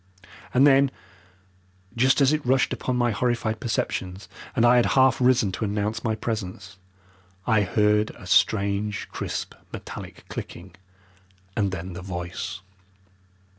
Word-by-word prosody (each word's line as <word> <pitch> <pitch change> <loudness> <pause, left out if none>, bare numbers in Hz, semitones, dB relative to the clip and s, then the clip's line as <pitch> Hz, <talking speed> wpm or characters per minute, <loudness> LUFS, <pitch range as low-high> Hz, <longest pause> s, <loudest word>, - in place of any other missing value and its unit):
And 130 +3 +5
then, 140 -1 +5 1.1
just 130 +4 +3
as 140 +2 +5
it 155 -1 0
rushed 130 +1 +2
upon 130 - -2
my 120 -1 +2
horrified 115 -1 -1
perceptions, 95 -4 -3 0.3
and 115 - +4
I 120 +1 +6
had 120 - +4
half 130 -2 +5
risen 125 -5 +3
to 95 - -4
announce 105 +2 -2
my 110 -2 0
presence, 95 -4 -5 0.7
I 110 -1 +3
heard 105 +2 +2
a 90 - -12
strange, 100 +2 +1
crisp, - - -4 0.2
metallic - - -9
clicking, - - -8 0.8
and 100 -4 +1
then 90 0 -5
the 90 - -7
voice. 90 +1 -5
110 Hz, 135 wpm, -25 LUFS, 95-125 Hz, 1.1 s, I